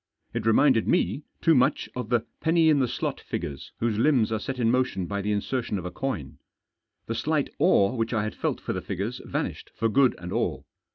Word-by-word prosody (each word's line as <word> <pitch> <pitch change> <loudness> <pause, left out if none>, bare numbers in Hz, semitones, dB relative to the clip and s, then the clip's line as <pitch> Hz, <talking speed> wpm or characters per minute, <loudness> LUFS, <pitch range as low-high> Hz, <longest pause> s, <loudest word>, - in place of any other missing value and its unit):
It - - -2
reminded 120 0 +4
me 155 -4 +1 0.2
too 165 - +5
much 130 -3 +2
of 125 -3 -4
the 120 -2 +3 0.2
penny 165 0 +3
in 145 - +3
the 130 - +2
slot - - -3
figures 70 -1 -5
whose 110 -2 0
limbs 120 -5 +3
are 110 - 0
set 135 +3 -4
in 115 -2 +2
motion 125 -7 0
by 100 +3 -3
the 105 +2 -1
insertion 105 +1 -1
of 90 - -6
a 90 - -4
coin. 90 - -4 0.7
The - - -3
slight - - 0
awe 100 +4 +4
which 115 -2 -1
I 110 -4 +1
had 110 - -3
felt - - -2
for - - -3
the - - -3
figures 110 +7 -4
vanished - - -3
for 115 - +1
good 130 +2 +4
and 90 0 -6
all. - - -1
115 Hz, 215 wpm, -26 LUFS, 105-130 Hz, 0.7 s, too